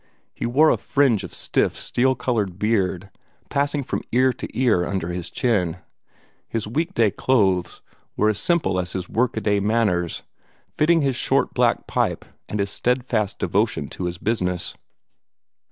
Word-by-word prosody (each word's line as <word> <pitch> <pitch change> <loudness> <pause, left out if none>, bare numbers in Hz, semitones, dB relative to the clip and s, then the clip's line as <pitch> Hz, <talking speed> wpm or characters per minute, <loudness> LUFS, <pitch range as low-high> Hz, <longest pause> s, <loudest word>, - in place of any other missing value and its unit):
He - - -3
wore 150 +6 +5
a - - +2
fringe 135 -7 +2
of - - -7
stiff, - - 0
steel 130 +2 +1
colored 110 -8 -1
beard, 100 -3 0 0.4
passing 140 0 0
from - - -3
ear 130 +2 +3
to - - -6
ear 120 -9 +3
under 95 -2 -2
his 90 -1 -4
chin. 90 -9 0 0.7
His 115 - -3
week 160 - -2
day 110 -3 +3
clothes 95 -9 +1 0.3
were 105 - +3
as 105 - 0
simple 150 - +1
as 90 -1 -3
his 90 -1 -4
workaday 110 -3 +1
manners, 100 -5 0 0.5
fitting 165 +2 +3
his 135 -2 +1
short - - +1
black - - +2
pipe - - -1 0.2
and 105 - -3
his 100 0 0
steadfast 120 -4 0
devotion - - 0
to 90 - -5
his 90 0 -3
business. 90 -4 -1
110 Hz, 155 wpm, -23 LUFS, 95-130 Hz, 0.7 s, wore